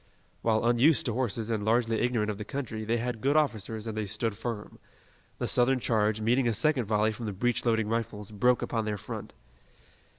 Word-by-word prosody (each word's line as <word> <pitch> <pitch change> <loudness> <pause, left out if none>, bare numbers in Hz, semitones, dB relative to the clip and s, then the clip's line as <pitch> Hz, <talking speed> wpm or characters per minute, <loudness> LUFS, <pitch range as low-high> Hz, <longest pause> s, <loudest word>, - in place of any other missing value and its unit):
While 110 0 +1
unused 120 +6 +4
to 120 - 0
horses 115 -2 -2
and 110 -2 -1
largely 115 +1 +2
ignorant 115 -4 +1
of 100 - -7
the - - -3
country, 115 -3 -5
they 115 +2 +1
had 120 -1 -3
good 140 +3 +2
officers 110 -7 0
and 110 -1 -4
they 110 -1 -2
stood 110 +1 -2
firm. 110 -1 -6 0.6
The - - -2
Southern 130 +1 +4
charge, 110 -2 +1
meeting 120 +3 +2
a 115 - +2
second 145 -1 +1
volley 105 +1 +2
from 115 0 -6
the 105 - -3
breech 120 +4 0
loading 110 -2 +2
rifles, 110 -2 -3
broke 125 +4 +2
upon 115 -2 -1
their 105 -1 -2
front. - - -7
115 Hz, 200 wpm, -29 LUFS, 110-120 Hz, 0.6 s, unused